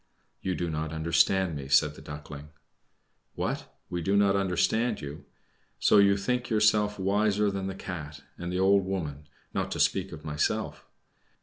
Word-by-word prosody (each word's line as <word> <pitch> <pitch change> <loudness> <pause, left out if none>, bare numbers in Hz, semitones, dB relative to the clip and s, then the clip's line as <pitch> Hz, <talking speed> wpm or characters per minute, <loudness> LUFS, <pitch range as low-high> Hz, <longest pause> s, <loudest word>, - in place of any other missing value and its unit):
"You 95 -1 -1
do 85 - -2
not 80 0 -3
understand 85 +2 +2
me," 70 -2 -6
said 70 +2 +4
the - - -13
Duckling. 75 0 -9 0.9
"What! - - -3 0.2
we 90 - -3
do 100 +4 +1
not 100 -1 +4
understand 100 +5 +1
you? 70 +1 -8 0.5
So 105 - +5
you 100 0 +5
think 125 +5 -1
yourself 105 -1 +3
wiser 100 +1 +2
than 95 -1 -3
the 95 - -4
Cat 75 -6 -7
and 85 0 -5
the 90 - -1
old 100 +1 +4
woman, 75 -6 -4 0.3
not - - -1
to - - -5
speak 95 0 +1
of 80 -1 -10
myself? 75 -1 -2
95 Hz, 165 wpm, -28 LUFS, 75-100 Hz, 0.9 s, So